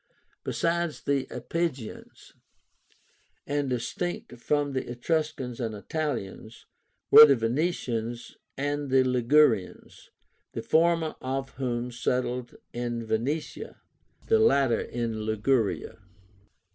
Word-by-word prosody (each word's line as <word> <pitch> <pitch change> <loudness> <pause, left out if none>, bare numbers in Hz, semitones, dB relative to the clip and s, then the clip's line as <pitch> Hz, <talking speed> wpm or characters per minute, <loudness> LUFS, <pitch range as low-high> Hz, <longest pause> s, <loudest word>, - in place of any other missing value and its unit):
Besides 170 -1 -1
the 140 -1 0
Iapygians, 160 -9 -5 1.1
and 145 -1 -1
distinct 125 +2 -4
from 145 +2 0
the 130 - -3
Etruscans 130 -1 -2
and 115 -3 -3
Italians, 115 -4 -5 0.5
were 150 - +12
the 140 - +5
Venetians 120 -2 -2 0.2
and 145 +1 -2
the 130 0 +5
Ligurians, 125 -4 +1 0.4
the - - -4
former 165 -1 +2
of 135 +1 -3
whom 125 -2 -3
settled 125 0 -2 0.2
in 120 -1 -3
Venetia, 145 - -3 0.5
the 450 - +3
latter 135 - +3
in 115 -2 -3
Liguria. 110 +1 0
130 Hz, 95 wpm, -27 LUFS, 120-150 Hz, 1.1 s, were